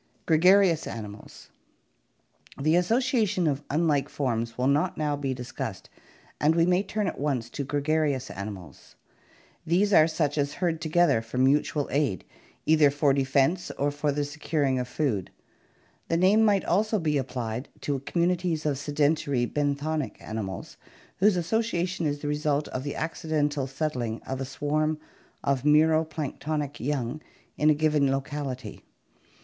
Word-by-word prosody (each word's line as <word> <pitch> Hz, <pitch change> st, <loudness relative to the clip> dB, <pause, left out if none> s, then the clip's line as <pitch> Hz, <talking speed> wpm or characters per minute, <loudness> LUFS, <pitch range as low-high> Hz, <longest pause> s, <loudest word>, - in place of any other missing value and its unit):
gregarious 180 Hz, +1 st, +4 dB
animals 105 Hz, -2 st, -9 dB, 1.1 s
The 155 Hz, +4 st, +3 dB
association 215 Hz, 0 st, +2 dB
of 145 Hz, -2 st, 0 dB
unlike 150 Hz, -2 st, +1 dB
forms 115 Hz, -4 st, -2 dB
will 125 Hz, -, 0 dB
not 145 Hz, +6 st, +1 dB
now 150 Hz, -2 st, 0 dB
be 135 Hz, -2 st, -2 dB
discussed 125 Hz, -4 st, -6 dB, 0.5 s
and 155 Hz, +2 st, +3 dB
we 165 Hz, 0 st, +4 dB
may 180 Hz, +1 st, +3 dB
turn 210 Hz, +1 st, -2 dB
at -, -, -3 dB
once 130 Hz, -5 st, -1 dB
to 140 Hz, -, -3 dB
gregarious 145 Hz, -1 st, 0 dB
animals. 100 Hz, -4 st, -9 dB, 0.7 s
These 195 Hz, +5 st, +2 dB
are 155 Hz, -3 st, +7 dB
such 155 Hz, -2 st, -1 dB
as 140 Hz, 0 st, 0 dB
herd 170 Hz, -3 st, -1 dB
together 165 Hz, -6 st, +3 dB
for 115 Hz, +2 st, -7 dB
mutual 140 Hz, +2 st, +2 dB
aid, 140 Hz, -, 0 dB, 0.4 s
either 155 Hz, -2 st, +5 dB
for 145 Hz, 0 st, +2 dB
defense 140 Hz, +6 st, +1 dB
or 145 Hz, +1 st, +1 dB
for 145 Hz, +1 st, -1 dB
the 145 Hz, +1 st, -1 dB
securing 145 Hz, -2 st, -1 dB
of 125 Hz, -, -3 dB
food. 125 Hz, -, -1 dB, 0.8 s
The 165 Hz, -, +1 dB
name 195 Hz, +5 st, +4 dB
might 205 Hz, -3 st, +3 dB
also 215 Hz, +4 st, +2 dB
be 155 Hz, -6 st, +1 dB
applied 125 Hz, -1 st, -4 dB
to 140 Hz, -2 st, -1 dB
communities 170 Hz, +1 st, 0 dB
of 140 Hz, -3 st, 0 dB
sedentary 145 Hz, -3 st, +1 dB
benthonic 145 Hz, +2 st, -2 dB
animals 100 Hz, -5 st, -6 dB, 0.4 s
whose 200 Hz, 0 st, +4 dB
association 180 Hz, -3 st, -1 dB
is 145 Hz, 0 st, -3 dB
the 150 Hz, -, -4 dB
result 150 Hz, 0 st, 0 dB
of 130 Hz, -, -4 dB
the 145 Hz, -, -4 dB
accidental 150 Hz, -3 st, -1 dB
settling 130 Hz, -5 st, -3 dB
of 130 Hz, 0 st, -4 dB
a -, -, -2 dB
swarm 155 Hz, +3 st, -1 dB, 0.5 s
of 135 Hz, -2 st, 0 dB
mero 155 Hz, +2 st, +4 dB
planktonic 150 Hz, -1 st, -4 dB
young 140 Hz, +1 st, -2 dB, 0.3 s
in 150 Hz, -, +3 dB
a 155 Hz, -, +5 dB
given 150 Hz, -2 st, +2 dB
locality. 135 Hz, -5 st, -4 dB
150 Hz, 145 wpm, -27 LUFS, 135-160 Hz, 1.1 s, are